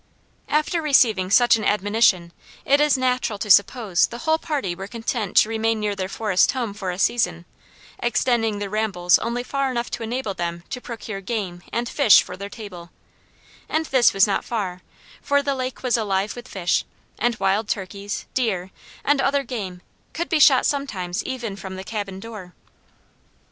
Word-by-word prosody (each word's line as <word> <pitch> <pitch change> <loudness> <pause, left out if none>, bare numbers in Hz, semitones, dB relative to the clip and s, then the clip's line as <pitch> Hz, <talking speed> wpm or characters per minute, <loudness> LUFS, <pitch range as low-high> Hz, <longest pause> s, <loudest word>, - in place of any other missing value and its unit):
After 305 +3 +1
receiving 225 -11 +3
such 240 +3 +5
an 215 - -5
admonition 205 -4 +2 0.3
it 280 +1 +4
is 295 -2 +4
natural 250 -4 0
to 210 0 -1
suppose 200 -1 +4
the 235 - -8
whole 320 +4 +1
party 280 - -2
were 190 +2 -7
content 225 -2 -3
to 215 - +6
remain 225 0 0
near 210 -1 -1
their 190 -1 -3
forest 205 0 +2
home 240 -6 -3
for 195 -2 -5
a 180 - -3
season, 180 -4 +1 0.5
extending 235 -2 +1
their 205 0 -3
rambles 195 -5 +2
only 235 +1 -2
far 275 +1 -1
enough 240 -2 -3
to 240 - -4
enable 230 -2 -3
them 170 -1 -4
to 250 - -4
procure 220 -4 -7
game 190 -4 -4
and 240 +1 -1
fish 235 -5 +6
for 180 - -8
their 200 +2 -7
table; 190 -6 -10 0.8
and 320 +1 0
this 260 -5 +4
was 195 0 +5
not 200 - -1
far, 190 -6 -3 0.4
for 285 0 +1
the 280 0 0
lake 255 -1 -4
was 250 -2 +2
alive 200 -2 -1
with 245 +1 -9
fish; 180 -6 0 0.4
and 240 +1 +1
wild 200 +1 0
turkeys, 200 0 -4
deer, 190 -7 -1 0.3
and 285 -1 +3
other 275 +1 +1
game 200 -8 -6 0.3
could 340 +2 -3
be 320 - +2
shot 275 -3 +6
sometimes 195 -11 -2
even 240 -6 -4
from 190 -1 -8
the 190 - -7
cabin 200 -2 -5
door. 200 -4 -10
220 Hz, 175 wpm, -23 LUFS, 190-250 Hz, 0.8 s, to